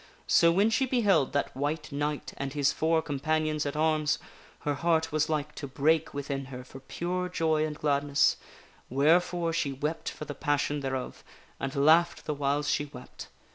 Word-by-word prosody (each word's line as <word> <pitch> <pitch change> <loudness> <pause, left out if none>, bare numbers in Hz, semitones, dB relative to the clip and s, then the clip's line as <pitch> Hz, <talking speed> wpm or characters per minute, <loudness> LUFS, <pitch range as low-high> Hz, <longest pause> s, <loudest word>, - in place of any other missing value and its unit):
So 170 - +5
when 200 +6 +3
she 260 +4 +2
beheld 205 - +2
that 145 - -1
White 150 +3 -2
Knight 145 +1 -3
and 135 -1 -4
his 140 -1 +2
four 160 0 +1
com 145 -3 -4
panions 155 0 0
at 145 - -4
arms, 155 -1 +2 0.4
her 145 - 0
heart 160 +2 +1
was 155 0 +1
like 150 -1 -2
to 140 - -6
break 155 +4 +1
within 140 -1 -4
her 130 -1 -8
for 130 +1 -12
pure 180 +6 -3
joy 160 -3 +1
and 150 -1 -6
gladness, 145 -2 +2 0.5
wherefore 165 +5 +2
she 160 -4 0
wept 150 +4 -3
for 150 - -8
the 145 - -5
passion 145 0 0
thereof, 130 -2 -4 0.4
and 135 0 -3
laughed 160 +5 +4
the 150 - -1
whiles 145 +1 0
she 145 - +1
wept. 125 -3 -11
150 Hz, 175 wpm, -28 LUFS, 140-160 Hz, 0.5 s, So